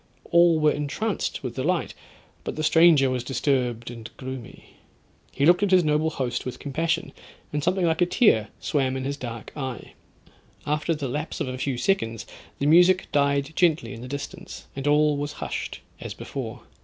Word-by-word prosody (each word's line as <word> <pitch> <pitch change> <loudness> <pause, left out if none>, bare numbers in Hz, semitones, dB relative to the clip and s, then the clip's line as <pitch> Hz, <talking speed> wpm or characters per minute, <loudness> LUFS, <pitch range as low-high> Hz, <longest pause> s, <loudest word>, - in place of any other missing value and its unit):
All 170 -2 +5
were 150 -1 +4
entranced 150 +10 -2
with 125 -3 -4
delight, 165 +6 0 0.5
but - - -4
the 155 - -3
stranger 155 -4 +5
was 125 -2 -2
disturbed 125 -3 -1
and 115 -2 -9
gloomy; 130 -2 -9 0.5
he 140 - 0
looked 175 +4 +5
at 205 - +2
his 185 -1 +5
noble 155 +1 +2
host 130 -5 -2
with 125 - -5
compassion, 165 +4 -2 0.4
and 150 -1 -1
something 180 +2 +1
like 160 0 +1
a 175 - +5
tear 175 - +4
swam 135 -3 0
in 130 - -4
his 140 +1 -2
dark 115 -4 -7
eye. 130 -4 -6 0.7
After 150 +3 0
the 145 -2 -3
lapse 150 +5 -4
of - - -1
a 130 - -3
few 130 -2 -1
seconds, 115 - 0 0.3
the 140 - -2
music 180 +4 +5
died 140 +1 +1
gently 160 -10 +2
in 115 - -9
the 125 - -7
distance, 140 +1 -7
and 135 +1 -3
all 150 0 +4
was 145 0 -3
hushed - - -5 0.2
as - - -7
before. - - -6
145 Hz, 180 wpm, -25 LUFS, 130-165 Hz, 0.7 s, All